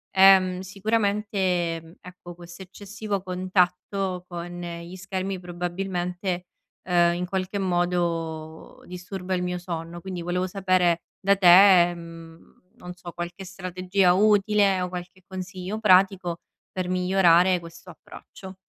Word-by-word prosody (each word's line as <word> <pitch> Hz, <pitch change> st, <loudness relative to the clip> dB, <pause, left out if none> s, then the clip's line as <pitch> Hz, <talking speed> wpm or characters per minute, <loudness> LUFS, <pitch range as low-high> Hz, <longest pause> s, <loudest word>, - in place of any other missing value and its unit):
ehm, 190 Hz, -1 st, +6 dB
sicuramente 190 Hz, -4 st, -1 dB
ecco, 180 Hz, -1 st, -12 dB
questo 175 Hz, +1 st, -12 dB
eccessivo 200 Hz, +1 st, -6 dB
contatto 185 Hz, 0 st, -1 dB
con 175 Hz, 0 st, -7 dB
gli 170 Hz, 0 st, -7 dB
schermi 190 Hz, 0 st, -4 dB
probabilmente, 180 Hz, +1 st, -4 dB, 0.4 s
ehm, 175 Hz, -1 st, +3 dB
in 180 Hz, +1 st, -3 dB
qualche 190 Hz, +2 st, -3 dB
modo 170 Hz, -3 st, -2 dB
disturba 180 Hz, +1 st, -6 dB
il 180 Hz, -, -2 dB
mio 180 Hz, 0 st, -2 dB
sonno. 170 Hz, -1 st, -6 dB
Quindi 185 Hz, -1 st, -6 dB
volevo 180 Hz, +2 st, -2 dB
sapere 185 Hz, -3 st, +1 dB, 0.2 s
da 200 Hz, +1 st, +3 dB
te, 180 Hz, -1 st, +7 dB
mhmm, 165 Hz, -1 st, -13 dB, 0.2 s
non 180 Hz, 0 st, -9 dB
so, 175 Hz, -1 st, -10 dB
qualche 175 Hz, +3 st, -7 dB
strategia 185 Hz, 0 st, 0 dB
utile 205 Hz, -1 st, +3 dB
o 180 Hz, -, -2 dB
qualche 180 Hz, +1 st, -8 dB
consiglio 190 Hz, +2 st, -6 dB
pratico 185 Hz, -4 st, +3 dB, 0.3 s
per 185 Hz, -1 st, -3 dB
migliorare 180 Hz, -1 st, +3 dB
questo 170 Hz, +2 st, -13 dB
approccio. 190 Hz, +3 st, -13 dB
180 Hz, 120 wpm, -25 LUFS, 175-190 Hz, 0.4 s, te